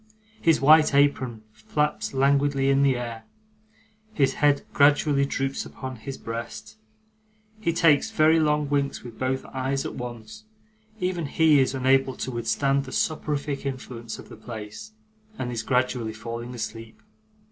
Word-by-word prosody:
His 165 -2 +4
white 150 +1 +6
apron 130 -6 +2
flaps 150 +6 -2
languidly 140 0 +2
in 135 0 +3
the 135 -3 +3
air, 115 -2 -6 0.9
his 135 -2 +2
head 145 -1 +4
gradually 145 -1 +4
droops 135 0 -2
upon 130 -1 -8
his 135 +4 -7
breast, 115 - -7 0.8
he 190 -6 0
takes 160 -3 +3
very 155 +1 +4
long 150 -1 +1
winks 140 -1 -1
with 120 -2 -11
both 130 +1 -1
eyes 135 +1 -1
at - - -4
once; 120 - -8 0.5
even 180 -4 -1
he 155 0 +4
is 130 0 +1
unable 130 0 +2
to 130 - -4
withstand 135 +4 0
the - - -9
soporific 150 -2 -2
influence 125 -4 -6
of - - -12
the - - -11
place, 110 - -9 0.4
and 125 -7 -3
is 115 -2 -2
gradually 125 -1 0
falling 115 +2 -6
asleep. 115 -1 -7
135 Hz, 145 wpm, -25 LUFS, 120-145 Hz, 0.9 s, white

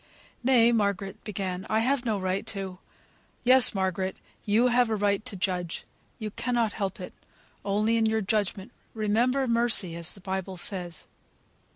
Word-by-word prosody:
"Nay," 240 -2 +5
Margaret 200 -2 -1
began, 190 -3 -4
"I 220 +1 +2
have 260 +1 +1
no 220 -3 +1
right 185 +1 -1
to 190 -2 -4 0.3
" - - -36
"Yes, 255 -3 +6
Margaret, 190 0 -1 0.3
you 225 +4 +3
have 245 -1 +3
a 220 - +1
right 205 0 +1
to 240 -5 -4
judge; 180 -2 -2 0.3
you 215 -2 -5
cannot 235 -1 0
help 195 -1 -3
it; 180 - -7 0.5
only 210 +3 +1
in 225 -1 +3
your 220 0 +1
judgment 205 +1 -1 0.2
remember 235 +5 +1
mercy, 230 -7 +2
as 170 0 -1
the - - -14
Bible 190 0 -4
says. 175 -2 -1
205 Hz, 160 wpm, -27 LUFS, 190-230 Hz, 0.5 s, Yes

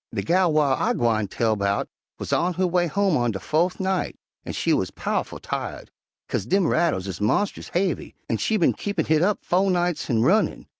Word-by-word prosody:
"De - - -3
gal 180 0 +3
whar 150 -3 +3
I - - +1
gwine 110 -3 +1
tell 110 +2 0
'bout 100 0 0 0.3
wuz - - -4
on 180 0 +1
her 185 +2 +1
way 175 0 +1
home 195 +1 +1
on 120 -2 +1
de 100 -4 -3
fo'th 170 - 0
night, 190 -1 -1 0.3
an' - - -6
she - - +1
wuz - - +1
pow'ful - - -2
tired, - - -5 0.4
'kase 100 - -2
dem 195 +3 +2
rattles 160 - +1
is 95 -3 -5
monst'ous 195 - 0
haivy, 180 -3 -1
an' 115 - 0
she 220 - 0
bin 175 - +3
keepin' 205 0 -2
hit 155 0 +2
up 200 +3 +2
fo' 190 +2 +2
nights 175 -2 0
han' 115 -4 +2
runnin'. 195 - +2
170 Hz, 205 wpm, -24 LUFS, 120-185 Hz, 0.4 s, gal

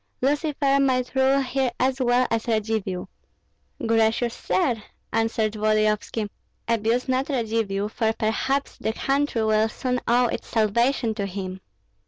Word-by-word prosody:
Lucifer 285 0 +1
might 255 -2 +1
rule 265 +1 +3
here 265 0 0
as 260 +1 +1
well 250 0 +3
as 230 0 -1
Radzivill." 215 -4 -1 0.8
"Gracious 225 +1 +2
sir," 245 -6 0 0.3
answered 225 -1 +1
Volodyovski, 215 0 +1 0.4
"abuse 230 +2 +1
not 260 +2 0
Radzivill, 220 -6 -1
for 220 0 0
perhaps 225 +6 -1
the 220 - -1
country 275 -2 0
will 215 0 +3
soon 250 +1 -2
owe 245 +1 +4
its 235 - -3
salvation 230 +2 +1
to 205 -2 -3
him." 190 -1 -6
230 Hz, 130 wpm, -24 LUFS, 215-260 Hz, 0.8 s, owe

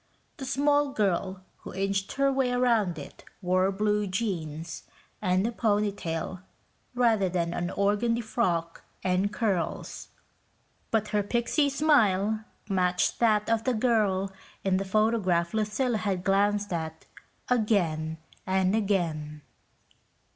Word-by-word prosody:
The 270 - -6
small 285 +2 +2
girl 190 -2 -1
who - - -10
inched 195 0 -1
her 275 0 +2
way 265 -2 +1
around 230 -8 +2
it 145 - -10 0.2
wore 185 0 +2
blue 210 +1 0
jeans 170 -6 -3 0.4
and 185 0 +2
a 235 - 0
pony 210 -3 +1
tail 170 -1 -4 0.6
rather 225 -6 +3
than 170 -1 -1
an 175 0 -2
organdy 210 +5 +1
frock 175 -8 -1 0.2
and 185 +2 +1
curls, 205 -6 -2 0.8
but 215 -2 0
her 210 - +1
pixie 240 +7 +1
smile 220 -8 +2 0.2
matched 180 -2 +1
that 215 -3 +3
of 225 -1 +1
the 255 0 +1
girl 210 -5 +1 0.3
in 190 -1 +2
the 195 - -2
photograph 190 -4 +1
Lucilla 220 +3 0
had 185 -2 -2
glanced 205 0 +1
at 160 -1 -4 0.4
again 175 -10 +1 0.3
and 190 +1 +2
again. 160 -8 -1
200 Hz, 125 wpm, -28 LUFS, 185-225 Hz, 0.8 s, rather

